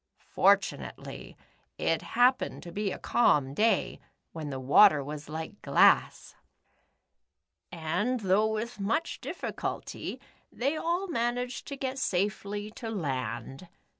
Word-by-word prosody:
For -, -, +6 dB
tunately, 60 Hz, 0 st, -8 dB, 0.4 s
it 165 Hz, -1 st, 0 dB
happened 250 Hz, +2 st, +1 dB
to 175 Hz, -, -9 dB
be 200 Hz, +2 st, -2 dB
a -, -, -4 dB
calm 145 Hz, -, +2 dB
day, 225 Hz, +9 st, +1 dB, 0.3 s
when 155 Hz, -3 st, -6 dB
the 135 Hz, -2 st, -4 dB
water 145 Hz, +4 st, +6 dB
was 150 Hz, +1 st, -7 dB
like 160 Hz, +6 st, -6 dB
glass, -, -, +3 dB, 1.4 s
and, 180 Hz, +9 st, -1 dB
though 200 Hz, +2 st, +3 dB
with 220 Hz, +1 st, -4 dB
much 225 Hz, +12 st, -1 dB
diffi -, -, -5 dB
culty, -, -, -5 dB, 0.3 s
they 275 Hz, +5 st, -1 dB
all 345 Hz, +5 st, -1 dB
managed 245 Hz, -4 st, -2 dB
to 280 Hz, -, -6 dB
get 265 Hz, 0 st, -3 dB
safely 205 Hz, 0 st, -2 dB
to 225 Hz, +1 st, -7 dB
land. 135 Hz, -, -4 dB
205 Hz, 125 wpm, -29 LUFS, 155-240 Hz, 1.4 s, For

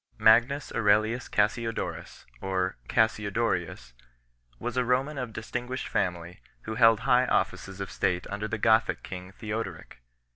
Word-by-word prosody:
Magnus 120 Hz, +6 st, +4 dB
Aurelius 110 Hz, +2 st, +2 dB
Cassiodorus 115 Hz, +2 st, -2 dB
1 95 Hz, -, -6 dB
(or 95 Hz, -1 st, 0 dB
Cassiodorius) 105 Hz, -, 0 dB, 0.6 s
was 120 Hz, -, -4 dB
a 125 Hz, -, +2 dB
Roman 135 Hz, +4 st, 0 dB
of 125 Hz, -3 st, -4 dB
distinguished 125 Hz, +3 st, -4 dB
family, 90 Hz, -2 st, -2 dB, 0.2 s
who 110 Hz, -, -5 dB
held 115 Hz, -1 st, +5 dB
high 125 Hz, 0 st, +3 dB
offices 95 Hz, -4 st, -1 dB
of 100 Hz, -, -5 dB
state 90 Hz, -1 st, 0 dB
under 105 Hz, +1 st, -3 dB
the 115 Hz, -, -3 dB
Gothic 110 Hz, +1 st, +2 dB
king 90 Hz, 0 st, -8 dB
Theoderic. 105 Hz, -, -6 dB
110 Hz, 135 wpm, -28 LUFS, 95-120 Hz, 0.6 s, held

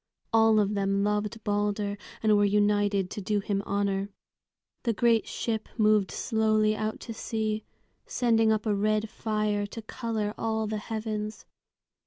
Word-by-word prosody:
All 225 Hz, -1 st, +5 dB
of 205 Hz, 0 st, +1 dB
them 200 Hz, 0 st, +1 dB
loved 210 Hz, +1 st, -1 dB
Balder, 205 Hz, 0 st, 0 dB, 0.3 s
and 215 Hz, -1 st, +5 dB
were 205 Hz, -, +4 dB
united 205 Hz, -1 st, +2 dB
to 210 Hz, -, -5 dB
do 205 Hz, +2 st, 0 dB
him 200 Hz, 0 st, -1 dB
honor. 200 Hz, 0 st, 0 dB, 0.7 s
The 235 Hz, -, 0 dB
great 230 Hz, 0 st, +3 dB
ship 220 Hz, -2 st, -3 dB
moved 215 Hz, -3 st, +4 dB
slowly 215 Hz, -2 st, +1 dB
out 215 Hz, 0 st, -3 dB
to 230 Hz, -, -6 dB
sea, 220 Hz, -1 st, -2 dB, 0.4 s
sending 225 Hz, -2 st, +3 dB
up 215 Hz, 0 st, 0 dB
a 215 Hz, -, +2 dB
red 215 Hz, +1 st, 0 dB
fire 210 Hz, -2 st, -1 dB
to 225 Hz, +3 st, -7 dB
color 220 Hz, -2 st, -3 dB
all 220 Hz, -1 st, 0 dB
the 215 Hz, 0 st, -2 dB
heavens. 215 Hz, -1 st, -4 dB
215 Hz, 150 wpm, -28 LUFS, 205-220 Hz, 0.7 s, All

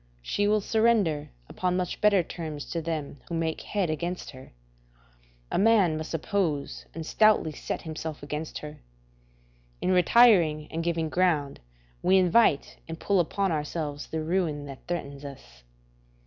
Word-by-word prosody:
She 205 Hz, -, 0 dB
will 210 Hz, 0 st, +3 dB
surrender 215 Hz, -9 st, +2 dB, 0.2 s
upon 180 Hz, -1 st, -1 dB
much 180 Hz, -1 st, -3 dB
better 205 Hz, -4 st, +4 dB
terms 155 Hz, -3 st, -6 dB
to 165 Hz, -, -2 dB
them 155 Hz, -4 st, -4 dB
who 170 Hz, -, -3 dB
make 165 Hz, -1 st, -2 dB
head 195 Hz, -6 st, -1 dB
against 175 Hz, +3 st, -4 dB
her: 130 Hz, -1 st, -13 dB, 1.0 s
a -, -, +1 dB
man 200 Hz, -6 st, +4 dB
must 155 Hz, 0 st, -5 dB
oppose 160 Hz, -4 st, -2 dB
and 165 Hz, -1 st, -5 dB
stoutly 215 Hz, -4 st, +3 dB
set -, -, -5 dB
himself 155 Hz, -2 st, -6 dB
against 150 Hz, +2 st, -5 dB
her. 150 Hz, 0 st, -9 dB, 1.0 s
In 185 Hz, -, 0 dB
retiring 180 Hz, -5 st, +5 dB
and 165 Hz, +1 st, -3 dB
giving 165 Hz, -1 st, 0 dB
ground, 155 Hz, -6 st, +1 dB, 0.4 s
we 190 Hz, +1 st, +4 dB
invite 180 Hz, -4 st, +3 dB
and 165 Hz, 0 st, -7 dB
pull 200 Hz, -2 st, +1 dB
upon 195 Hz, +3 st, 0 dB
ourselves 150 Hz, -1 st, -3 dB
the 160 Hz, -1 st, -3 dB
ruin 160 Hz, -4 st, -1 dB
that 135 Hz, -2 st, -11 dB
threatens 140 Hz, -5 st, -4 dB
us. 140 Hz, -, -11 dB
165 Hz, 150 wpm, -27 LUFS, 150-185 Hz, 1.0 s, retiring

